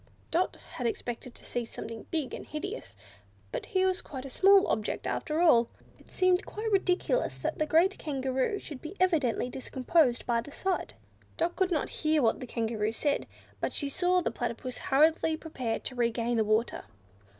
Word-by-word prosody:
Dot 350 +3 +1 0.2
had 245 - 0
expected 240 +1 -4
to - - -14
see 240 - -2
something 225 -1 -8
big 310 -6 -2
and - - -5
hideous; 295 - -6 0.6
but - - -4
here 375 -1 +2
was 375 0 +1
quite 265 -2 -7
a 270 - -7
small 390 +4 +6
object 215 - -1
after 310 +1 -1
all! 240 -9 +5 0.3
It - - -20
seemed 370 +1 +3
quite 435 +1 -4
ridiculous 385 +5 +1
that - - -3
the 310 - +1
great 345 +6 +3
Kangaroo 265 +4 -1
should 290 -8 -8
be 320 +5 -7
evidently 315 -11 +2
discomposed 260 +1 +1
by 235 -1 +1
the 285 - -11
sight. 375 +5 -2 0.4
Dot 345 +1 0
could 375 -1 +2
not 315 -6 0
hear 310 -2 +3
what 225 - +3
the 255 - -6
Kangaroo 220 -2 -1
said, 285 +5 0 0.3
but - - -2
she 285 - +1
saw 360 +4 +2
the - - -1
Platypus 240 +1 -4
hurriedly 315 +3 +3
prepare 255 -9 -3
to - - -4
regain 235 -1 0
the 220 - +4
water. 215 - 0
285 Hz, 180 wpm, -30 LUFS, 240-355 Hz, 0.6 s, small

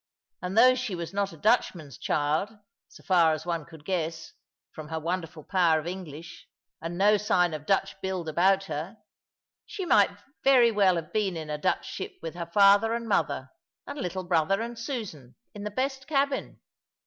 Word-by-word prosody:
And 185 +3 -4
though 255 +2 +8
she 250 -6 -3
was 170 +1 -6
not 200 0 -1
a 165 - -12
Dutchman's 170 - 0
child, 150 +6 0 0.4
so - - -17
far 170 -4 +4
as 155 +1 -5
one 170 -3 -2
could 160 -3 -15
guess, 165 -3 -3 0.4
from 155 -1 -9
her 160 +1 -3
wonderful 165 -1 -4
power 175 -3 +3
of 155 - -8
English, 170 -3 -8 0.3
and 165 +1 -5
no 205 +2 +5
sign 180 -4 +2
of 155 -1 -7
Dutch 195 - +1
build 185 -3 -3
about 190 +5 +3
her, 165 +4 -5 0.7
she 395 -3 -5
might - - +5 0.3
very 250 -4 +6
well 195 -4 +4
have 165 -2 -5
been 200 -5 0
in 155 -1 -6
a 150 - -3
Dutch - - 0
ship - - -6
with 165 -1 -6
her 170 -1 -6
father 205 +4 +5
and 235 -1 -4
mother, 140 -10 0 0.3
and 285 - -7
little 185 -4 -3
brother 175 +2 +1
and 235 +1 -5
Susan, 210 - -6 0.2
in 205 -1 -7
the - - -2
best 265 +4 -3
cabin. 280 -2 -1
185 Hz, 185 wpm, -27 LUFS, 160-210 Hz, 0.7 s, though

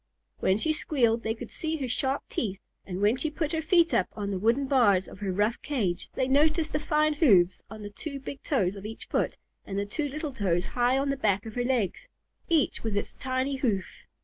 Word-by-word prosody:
When 190 - +3
she 315 +8 +1
squealed 240 -7 +1
they 225 -1 -1
could 240 0 -8
see 320 0 -2
her 270 -4 -3
sharp 265 +3 -1
teeth, 200 -4 -3 0.3
and 185 0 -4
when 215 +5 +4
she 310 +4 -1
put 305 0 -2
her 320 - 0
feet 340 +1 +4
up 185 - +3
on 205 -1 -3
the 190 - -2
wooden 235 +7 +2
bars 220 -9 +4
of - - -12
her 200 -2 -2
rough 210 +5 0
cage, 205 -12 -2
they 260 - +1
noticed 305 +3 +3
the 300 - +1
fine 305 0 +2
hoofs 195 - +4
on 215 0 -9
the 205 - -7
two 280 +5 -6
big 275 +1 -7
toes 200 - 0
of 195 - -9
each 220 +2 -7
foot - - -1 0.3
and 195 - -5
the 200 - 0
two 290 +9 -2
little 300 +1 -4
toes 185 -7 0
high 245 +5 +2
on 275 +1 +1
the 275 - -2
back 205 -5 +1
of 220 - -7
her 245 - -1
legs, 245 - -1 0.4
each 320 -5 +2
with 220 -3 -1
its - - -2
tiny 260 +1 -1
hoof. 215 -8 0
245 Hz, 230 wpm, -28 LUFS, 205-285 Hz, 0.4 s, when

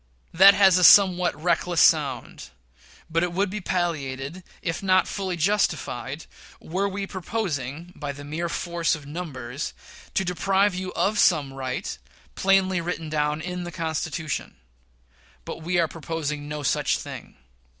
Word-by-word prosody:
That 195 +4 +8
has 190 -3 +6
a - - +1
somewhat 180 -5 +6
reckless 175 0 +1
sound; 145 -6 +2 0.6
but 165 0 0
it 175 0 -1
would 190 +1 0
be 210 0 -4
palliated, 160 -3 -3 0.2
if 165 -1 -2
not 185 -1 +3
fully 190 -3 -3
justified, 155 - -1 0.3
were 195 +5 -2
we 195 +1 -4
proposing, 175 - -4
by 145 -1 -4
the 145 0 -10
mere 160 +4 -3
force 170 -1 -1
of 150 -3 -11
numbers, 140 -5 -6 0.4
to 190 - +1
deprive 195 +3 +2
you 185 +1 -4
of 210 +1 +1
some 145 -6 +3
right 130 - -4 0.4
plainly 190 -2 +2
written 165 -2 -4
down 150 0 0
in 180 +1 -4
the 175 - -6
Constitution. 160 -1 -3 0.9
But - - -6
we 175 +2 -1
are 170 -2 +3
proposing 150 -2 -4
no 150 0 -5
such - - +1
thing. - - -9
170 Hz, 145 wpm, -25 LUFS, 150-185 Hz, 0.9 s, That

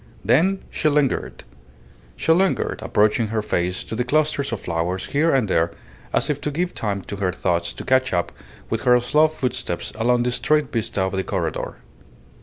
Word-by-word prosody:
Then 180 - +3
she 155 - +1
lingered. 145 -3 0 0.7
She - - +1
lingered, 185 +3 +2
approaching 105 +2 +2
her 110 0 -2
face 90 -3 -1
to - - -8
the 125 - 0
clusters 145 +1 +1
of 115 - -2
flowers 85 +2 -2
here 155 +4 +1
and 130 -5 +2
there 85 -2 +1 0.4
as - - +1
if 145 -1 -2
to - - -1
give 175 +5 -2
time 100 -3 -2
to 100 - -6
her 95 -2 0
thoughts 85 -1 -1
to - - -8
catch 130 0 +2
up 85 -1 0 0.4
with 115 - -2
her 125 0 +5
slow 150 +6 +4
footsteps 125 - -3
along 120 +2 +2
the 125 - 0
straight 150 +1 +1
vista 105 -4 -1
of 95 - -1
the 95 -1 -1
corredor. - - -3
120 Hz, 185 wpm, -22 LUFS, 95-145 Hz, 0.7 s, her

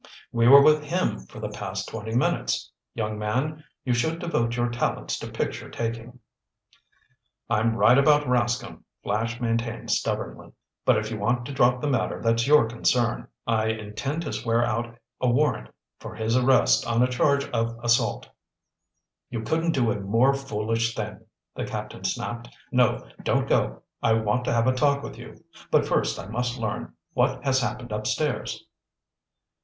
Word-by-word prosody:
"We 115 0 +3
were 140 +2 +10
with 155 0 +5
him 175 +5 -1
for 110 - -11
the 105 -1 -4
past 100 -2 -5
twenty 110 0 -5
minutes. 125 - 0 0.2
Young 110 -2 -3
man, 135 +9 -2 0.2
you 125 - +2
should 140 +8 0
devote 120 -9 -1
your 120 0 +1
talents 120 - -2
to - - -6
picture - - -4
taking." 115 +1 -5 1.3
"I'm 115 0 +2
right 115 +5 +5
about 150 +1 +4
Rascomb," 120 -1 0 0.2
Flash 115 +3 -1
maintained 115 -1 -2
stubbornly. - - -2 0.3
"But - - +5
if 110 +1 -3
you 110 - -4
want 120 +4 0
to 145 - -6
drop 125 -1 +3
the 150 - -1
matter 135 -2 0
that's 115 +1 +1
your 150 -5 +6
concern. 120 +1 0 0.2
I 110 -1 +1
intend 110 +8 -3
to 150 - -4
swear 115 0 +1
out 120 0 -3 0.2
a 125 - +2
warrant 120 - +1 0.3
for 110 -1 -8
his 110 +1 0
arrest 130 +1 +4
on 115 +1 +3
a - - +3
charge 140 +3 +2
of 115 -1 -1
assault." 120 0 +1 1.0
"You 115 -2 -4
couldn't 165 +5 0
do 120 -4 +2
a 105 - -2
more 115 +7 +3
foolish 115 -4 -1
thing," 105 -1 -5 0.3
the - - -4
captain - - -6
snapped. 120 0 -3 0.2
"No, 120 - +2
don't - - +1
go. - - 0 0.2
I 110 - +3
want 110 +2 +1
to - - 0
have 115 -1 +2
a 130 - +3
talk 140 +1 +2
with - - -8
you. - - -12 0.3
But - - +3
first - - +1
I - - -7
must 120 +4 -2
learn 110 -3 -4 0.2
what - - +1
has 130 -1 +3
happened 120 -1 -4
upstairs." 110 +7 -2
120 Hz, 165 wpm, -25 LUFS, 110-130 Hz, 1.3 s, were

